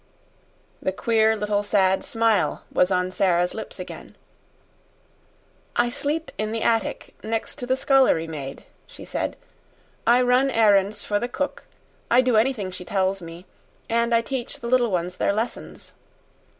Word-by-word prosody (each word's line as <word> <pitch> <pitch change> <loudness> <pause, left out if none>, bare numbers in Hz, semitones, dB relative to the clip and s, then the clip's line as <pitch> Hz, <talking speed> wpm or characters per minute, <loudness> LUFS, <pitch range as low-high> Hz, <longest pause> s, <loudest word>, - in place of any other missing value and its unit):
The 190 - 0
queer 220 +2 +2
little 210 -1 0
sad 195 -2 +2
smile 225 -4 +1
was 180 - +3
on 180 -1 0
Sara's 180 -2 +1
lips - - -7
again. - - -9 1.6
"I 240 0 +2
sleep 300 +5 -2
in 215 0 -1
the 225 0 -2
attic, 225 -1 -1
next 225 0 -3
to 245 - -6
the 260 - +2
scullery 265 - +3
maid," 140 -4 -7 0.2
she - - -11
said. - - -3 0.7
"I 245 +2 +5
run 250 +2 +3
errands 205 -3 +3
for 205 -1 0
the 240 - -2
cook 280 +3 -4 0.4
I 245 +2 +6
do 250 -2 +1
anything 220 -4 +1
she 180 - -7
tells 190 0 0
me; 170 +2 -10 0.4
and 235 +1 +1
I 230 - +4
teach 250 0 -5
the 235 - -6
little 245 -1 +3
ones 180 -1 -2
their - - +1
lessons." 220 +3 -5
220 Hz, 150 wpm, -24 LUFS, 190-240 Hz, 1.6 s, I